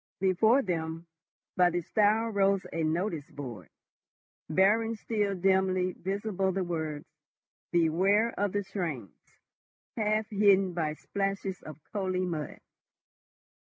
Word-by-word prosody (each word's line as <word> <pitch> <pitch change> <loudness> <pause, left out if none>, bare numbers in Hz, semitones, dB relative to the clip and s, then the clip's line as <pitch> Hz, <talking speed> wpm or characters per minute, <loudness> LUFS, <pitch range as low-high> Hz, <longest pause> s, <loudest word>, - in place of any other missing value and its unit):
Before 220 +8 +3
them, 165 -2 -3 0.5
by 180 -1 +5
the 175 0 -1
stile 215 +5 +2
rose 195 -2 +2
a 165 - -1
notice 160 -1 -1
board, 120 - -8 0.8
bearing 215 +7 +3
still 210 -2 -1
dimly 185 0 +2
visible, 195 +1 -2
the 190 0 -1
words, 160 -4 -4 0.7
"BEWARE 190 +7 +3
OF 205 -1 0
THE 205 +1 -1
TRAINS," 170 - -4 0.8
half 215 -1 0
hidden 195 -2 +4
by 160 -3 -1
splashes 195 +1 -3
of 155 -3 -9 0.2
coaly 185 -2 -1
mud. 160 -5 -4
190 Hz, 115 wpm, -29 LUFS, 165-205 Hz, 0.8 s, by